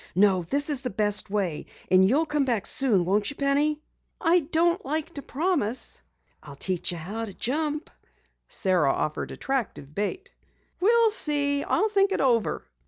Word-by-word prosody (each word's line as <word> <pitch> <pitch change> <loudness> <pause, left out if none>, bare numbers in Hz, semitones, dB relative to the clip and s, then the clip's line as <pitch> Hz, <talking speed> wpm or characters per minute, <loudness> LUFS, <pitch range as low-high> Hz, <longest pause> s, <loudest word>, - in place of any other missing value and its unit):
No, 190 -1 +4
this 285 - 0
is 275 -3 +2
the 255 - -3
best 210 -1 +2
way. 195 -7 -2 0.2
And 185 +1 +5
you'll 300 +7 +2
come 295 -2 0
back 235 -7 0
soon, 220 -10 +2
won't 205 +3 +1
you, 285 - -7
Penny?" 290 +2 +1 0.4
"I 355 -1 +3
don't 340 +4 +1
like 310 +4 -3
to 285 - -6
promise." 280 - -1 0.4
"I'll 145 -2 -11
teach 180 +5 -1
you 175 - -5
how 205 +8 -5
to 200 - -10
jump." 300 +5 -2 0.6
Sara 180 -8 +2
offered 155 - -3
attractive 225 - -4
bait. 210 - -4 0.5
"We'll 455 +3 +4
see. 285 -7 +1
I'll 435 - +1
think 395 -1 +2
it - - -1
over." 235 - +1
270 Hz, 165 wpm, -25 LUFS, 195-305 Hz, 0.6 s, And